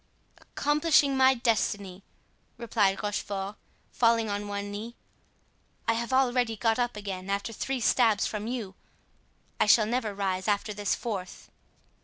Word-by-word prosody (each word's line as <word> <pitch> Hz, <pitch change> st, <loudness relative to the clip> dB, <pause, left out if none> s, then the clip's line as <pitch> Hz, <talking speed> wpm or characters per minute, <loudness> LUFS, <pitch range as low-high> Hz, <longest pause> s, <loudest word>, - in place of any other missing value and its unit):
"Accomplishing 295 Hz, -1 st, +2 dB
my 265 Hz, 0 st, +5 dB
destiny," 205 Hz, -5 st, -1 dB, 0.6 s
replied 215 Hz, -4 st, +1 dB
Rochefort, 205 Hz, -1 st, -3 dB, 0.4 s
falling 230 Hz, -2 st, +2 dB
on 205 Hz, 0 st, -3 dB
one 205 Hz, 0 st, -4 dB
knee. 220 Hz, +4 st, -6 dB, 0.9 s
"I 230 Hz, -, +4 dB
have 235 Hz, +2 st, -3 dB
already 250 Hz, -3 st, +2 dB
got 225 Hz, +2 st, +1 dB
up 240 Hz, -2 st, 0 dB
again 195 Hz, -2 st, -6 dB
after 200 Hz, +3 st, -2 dB
three 265 Hz, +4 st, -3 dB
stabs 225 Hz, -3 st, +3 dB
from 210 Hz, 0 st, -4 dB
you, 230 Hz, -6 st, -4 dB, 0.9 s
I -, -, +3 dB
shall 215 Hz, +1 st, +6 dB
never 225 Hz, -2 st, -2 dB
rise 190 Hz, -1 st, -2 dB
after 210 Hz, 0 st, 0 dB
this 205 Hz, -1 st, -1 dB
fourth." 195 Hz, -6 st, -6 dB
215 Hz, 135 wpm, -28 LUFS, 200-240 Hz, 0.9 s, shall